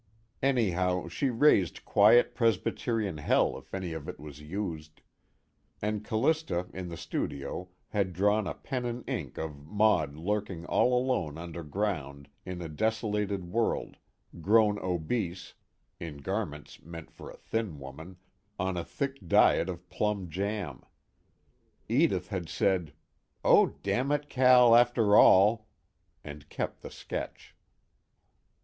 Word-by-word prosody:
Anyhow, 90 -10 +1
she 135 +10 -1
raised 115 - +3
quiet 110 +4 +5
Presbyterian 110 - 0
hell 75 - +2
if - - -22
any 95 -3 -4
of 80 -3 -6
it - - -8
was 75 -1 -10
used. 80 -2 -6 0.8
And 105 0 -2
Callista 115 - 0
in 90 -1 -6
the 85 - -7
studio 70 +7 -4 0.2
had 100 -3 0
drawn 105 +3 +1
a - - -4
pen 125 -3 -4
and 120 +1 -6
ink - - -4
of 75 -3 -6
Maud 105 -7 +2
lurking 95 0 -3
all 125 +6 +2
alone 120 - -1
underground 80 -4 -4 0.2
in 90 -1 -5
a - - -5
desolated 105 0 -2
world, 115 +2 -1 0.4
grown 105 +2 +4
obese 90 +1 -3 0.5
(in 80 -4 -7
garments 75 -2 -5
meant 85 0 -10
for - - -11
a - - -12
thin 110 -9 -3
woman) 80 +7 -10 0.4
on 95 -1 -2
a 85 - -2
thick 135 -1 -5
diet 85 - +4
of 90 0 -7
plum 95 -1 -2
jam. 100 +2 -3 1.1
Edith 115 - +1
had 90 -5 -4
said: 90 -6 0 0.5
"Oh, - - +6 0.2
damn 125 +8 0
it, 145 0 -1
Cal, 125 -2 +6
after 120 -3 +4
all!" 105 +4 +6 0.6
and 75 -1 -10
kept - - -4
the - - -8
sketch. - - -7
95 Hz, 130 wpm, -29 LUFS, 85-110 Hz, 1.1 s, Oh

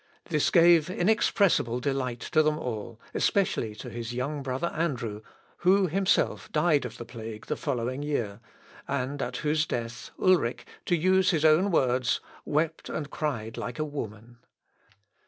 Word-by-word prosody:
This 150 -3 +2
gave 170 -2 +6
inexpressible 185 - +2
delight 130 -3 -2
to 155 - +2
them 155 0 +1
all, 115 -5 -5
especially 120 - +1
to - - -8
his 120 0 -5
young 140 +4 -2
brother 135 +5 -2
Andrew, 125 -10 -2 0.4
who 190 +2 +4
himself 190 +3 +1
died 150 -4 +2
of 120 0 -7
the 120 - -7
plague 115 -2 -8
the - - -2
following 130 -2 -2
year, 120 -9 -2 0.5
and 140 +1 -2
at - - -3
whose 150 0 +2
death 115 -1 -4
Ulric, 175 -10 +2 0.2
to 175 - +3
use 185 +3 +3
his 160 -4 +2
own 160 +6 +5
words, 125 -6 +2 0.3
wept 160 +2 -1
and 150 -2 -4
cried 115 -8 -3
like 120 - -5
a 155 - -1
woman. 115 -5 -7
140 Hz, 150 wpm, -28 LUFS, 120-160 Hz, 0.5 s, gave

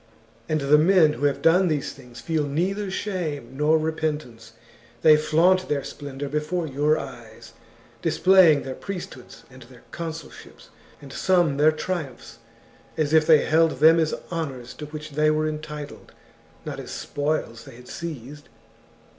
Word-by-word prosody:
And 155 -1 0
the 145 +2 +4
men 165 -2 +4
who 145 - -3
have 145 - 0
done 180 +3 +4
these 150 -4 -2
things 125 -3 -14
feel 160 -2 -1
neither 190 +7 -2
shame 160 - -4
nor 150 +3 +3
repentance; 150 -8 -4 0.5
they 155 -1 +8
flaunt 170 +5 +2
their 140 -2 -1
splendour 140 -1 -7
before 150 +4 -2
your 150 +2 +1
eyes, 120 -5 -10 0.5
displaying 180 -6 +5
their 135 - -5
priesthoods 180 -7 -8
and 130 0 -14
their 120 0 -16
consulships, 165 -1 -9 0.3
and 135 - -11
some 175 -6 +2
their 150 +2 +5
triumphs, 155 -7 -6 0.6
as 155 -1 0
if 160 0 +4
they 155 -3 +5
held 160 +1 +3
them 165 +2 +6
as 160 -1 0 0.2
honours 135 -8 -5
to 150 +3 -8
which 155 0 -8
they 155 +2 +2
were 155 0 +1
entitled, 150 -1 -7 0.5
not - - -6
as - - -8
spoils 145 -5 -3
they 135 -4 -12
had 125 +1 -15
seized. 150 -3 -8
155 Hz, 150 wpm, -24 LUFS, 140-165 Hz, 0.6 s, they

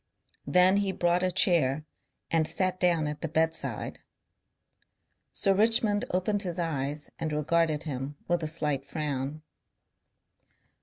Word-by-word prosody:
Then 180 +2 +5
he 200 -1 +1
brought 175 -1 +1
a 185 0 +1
chair 155 -6 +2 0.5
and 160 -1 +2
sat 185 -1 0
down 170 -3 +2
at 150 0 -4
the - - -2
bedside. 160 +1 -1 1.3
Sir 195 - +2
Richmond 215 0 +3
opened 195 +3 0
his 180 -3 -4
eyes 150 -3 -2
and 160 -1 -2
regarded 155 0 +1
him 140 -1 -5
with 175 -1 +1
a 155 - -2
slight 150 -3 0
frown. 145 0 -4
165 Hz, 125 wpm, -28 LUFS, 150-185 Hz, 1.3 s, Then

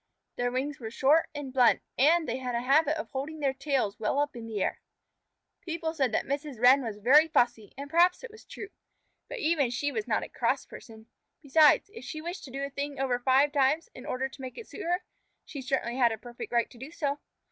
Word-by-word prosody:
Their 245 0 -1
wings 275 +3 -3
were 225 -3 -6
short 280 +7 +3
and 280 -3 -6
blunt, 250 -3 +4
and 315 +5 +4
they 240 +1 -2
had 250 -2 -4
a 235 - 0
habit 300 +4 +3
of 315 - -6
holding 290 +4 -5
their 275 -2 +1
tails 265 -7 -1
well 220 +5 -1
up 290 -1 0
in 230 -1 -7
the 220 -2 -4
air. - - -2 0.8
People 325 -1 -3
said 270 -5 0
that - - 0
Mrs. 280 -3 -4
Wren 255 +3 +6
was 225 -5 -5
very 275 +9 +6
fussy, 240 -8 +1
and 280 +1 -6
perhaps 345 +7 +3
it - - -8
was 440 - -15
true, 395 - -9 0.6
but - - -5
even 310 -2 +2
then - - -2
she 285 +4 -2
was 420 +7 -3
not - - 0
a - - -6
cross - - -1
person. 220 -2 -13 0.4
Besides, 305 +7 +4
if 460 - -10
she 310 - -6
wished 345 +4 -6
to 265 - -11
do 275 +2 -4
a 280 - -4
thing 280 0 -4
over 255 -2 0
five 265 +3 +3
times 290 - +1
in - - -11
order 260 +1 -1
to 270 - -13
make 255 -1 -8
it 465 - -9
suit - - -9
her, 355 +2 0 0.4
she 280 - -7
certainly 255 -2 -2
had 240 -3 +4
a 225 - -3
perfect 240 +2 -9
right 235 -1 +1
to 240 - -15
do 265 +4 -8
so. 290 -3 -2
275 Hz, 235 wpm, -28 LUFS, 245-310 Hz, 0.8 s, Wren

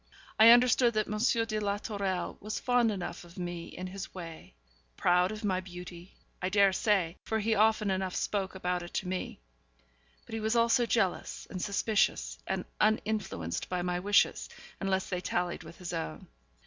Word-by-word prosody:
I 220 +1 +10
understood 240 0 +6
that 215 -1 +2
M. 210 +1 -3 0.3
de 215 -1 -2
la 205 -1 0
Tourelle 200 -3 -3
was 215 +1 -4
fond 245 -2 +3
enough 190 -5 -4
of 175 +2 -15
me 175 -2 -4
in 180 - -7
his 190 +1 -7
way 165 - -9 0.4
proud 180 +2 +3
of 215 +1 -7
my 190 -3 +1
beauty, 180 0 -10 0.3
I 185 - 0
dare 200 0 +4
say 185 -4 +1
(for 220 - -1
he 220 +1 +1
often 215 -1 +3
enough 190 -1 -1
spoke 195 -2 -1
about 180 -1 -1
it 175 - -9
to 185 - -1
me) 185 - -4 0.8
but - - -11
he 225 - -2
was 220 +2 0
also 235 +1 +3
jealous, 195 -6 0
and 185 - -4
suspicious, 210 +1 0
and - - -2
uninfluenced 210 - 0
by 180 -1 -1
my 180 0 -1
wishes, 205 +3 +2 0.3
unless 190 -1 0
they 180 -1 -2
tallied 175 -1 -1
with - - -12
his 180 -1 -6
own. 80 - -4
195 Hz, 175 wpm, -30 LUFS, 180-215 Hz, 0.8 s, I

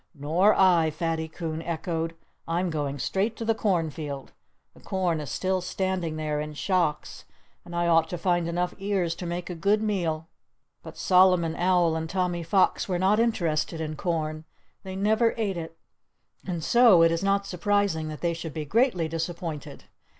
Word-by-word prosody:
"Nor 165 +9 +3
I!" 175 -4 +4
Fatty 160 +1 -2
Coon 160 0 -5
echoed. 165 0 -3 0.3
"I'm 175 +2 0
going 145 -3 -2
straight 195 - -1
to 230 - -4
the 225 - +3
cornfield. 160 -9 -2 0.4
The - - -18
corn 180 -4 -1
is 150 -4 -6
still 185 +7 -1
standing 180 -2 -2
there 150 -1 -2
in 150 0 -6
shocks; 160 0 -1 0.4
and 175 0 -9
I 170 0 +1
ought 165 -1 +3
to 175 - -3
find 175 -1 +1
enough 175 +1 -1
ears 195 -4 0
to 175 +1 -6
make 175 +1 -4
a - - -3
good 200 +6 +1
meal." 165 -7 -1 0.5
But - - -11
Solomon 180 -3 +4
Owl 175 -2 +2
and 160 0 -3
Tommy 180 -1 -1
Fox 185 +4 +1
were 180 - +1
not 195 +4 +3
interested 165 -8 0
in 155 -1 -3
corn. 155 -2 -2 0.4
They 190 -1 -7
never 220 +4 +2
ate 205 -4 -1
it. 165 -1 -7 0.7
And 170 -3 -3
so 230 -7 +6
it 165 - +5
is 165 0 -1
not 200 0 +1
surprising 195 -3 0
that 155 -1 -7
they 170 -1 +1
should 165 -2 -7
be 155 -1 -3
greatly 215 - +2
disappointed. 165 -1 -5
170 Hz, 170 wpm, -26 LUFS, 160-190 Hz, 0.7 s, so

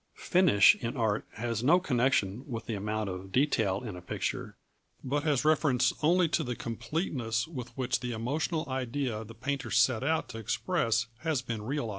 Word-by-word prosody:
Finish 175 - +5
in 120 +3 -4
art 110 -3 0
has 115 0 -2
no 165 +7 +5
connection 125 - +1
with 115 -2 -4
the 115 - -3
amount 105 +1 -2
of 95 0 -6
detail 110 -5 +1
in 105 -6 -5
a 90 - -8
picture, 90 - -4 0.5
but 140 +3 0
has 150 -2 +1
reference 140 -5 +3
only 175 +3 +4
to - - 0
the 125 -1 -3
completeness 115 -2 -2
with 125 -7 -6
which 130 -1 0
the 125 -1 -4
emotional 145 +8 -2
idea 130 -3 -2
the 115 +1 -12
painter 140 +3 -3
set 115 0 +3
out 160 +3 +1
to 115 - -6
express 115 - 0
has 155 -4 -1
been 115 -3 -4
realised. 125 +1 -2
125 Hz, 175 wpm, -30 LUFS, 115-145 Hz, 0.5 s, Finish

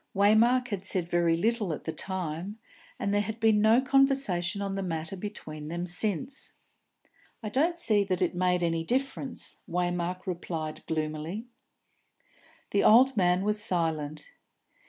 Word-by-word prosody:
Waymark 230 +5 +4
had 200 -4 -3
said 185 -3 -1
very 170 -1 +2
little 220 0 0
at - - -7
the 160 - -3
time, 185 +1 -4 0.4
and 200 - -1
there 205 - +3
had 220 +2 -5
been 220 -2 +4
no 220 +3 +5
conversation 265 -9 +2
on 200 -1 -2
the 195 - -2
matter 170 +1 -4
between 160 -6 -7
them 175 +2 -3
since. 200 - -2 0.9
"I 215 - -3
don't 320 +9 +1
see 215 -11 +2
that 185 -2 -1
it 180 -2 +1
made 180 0 +1
any 165 -1 0
difference," 265 +5 -3
Waymark 175 +1 -1
replied 165 -3 -4
gloomily. 155 +6 -3 1.3
The 200 - +2
old 255 +4 +6
man 180 -2 +2
was 210 0 0
silent. 155 -4 -2
190 Hz, 145 wpm, -28 LUFS, 170-220 Hz, 1.3 s, old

